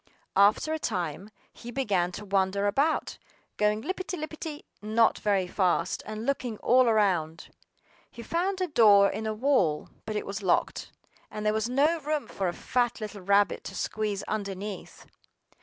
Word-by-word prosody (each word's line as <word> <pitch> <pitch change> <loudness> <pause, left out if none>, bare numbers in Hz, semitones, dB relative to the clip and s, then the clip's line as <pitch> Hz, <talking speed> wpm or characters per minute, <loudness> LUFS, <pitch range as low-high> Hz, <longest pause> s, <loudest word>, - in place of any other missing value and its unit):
After 205 +10 +4
a 315 - -2
time 185 - -3 0.2
he 240 - -10
began 200 -9 0
to 210 - -7
wander 195 0 +1
about, 275 +10 0 0.4
going 210 +1 +1
lippity 370 +3 -4
lippity 310 0 -6 0.2
not 220 +2 +2
very 200 -3 +1
fast, 180 -1 0
and 215 +1 -5
looking 250 -5 -2
all 250 +2 +4
around. 180 -7 +1 0.6
HE 235 - -10
found 370 - -1
a 365 - +1
door 205 - +6
in 220 +2 -4
a 215 - -1
wall; 215 - +1 0.2
but 215 - -3
it 210 - -2
was 200 +2 -5
locked, 185 -3 0 0.4
and 215 0 -6
there 210 - +3
was 220 +2 -1
no 295 +6 +2
room 300 0 -2
for 195 - -3
a - - 0
fat 240 +3 -1
little 210 -2 -6
rabbit 200 +2 +2
to - - -7
squeeze 210 -2 -2
underneath. 200 -1 -5
215 Hz, 160 wpm, -28 LUFS, 200-255 Hz, 0.6 s, door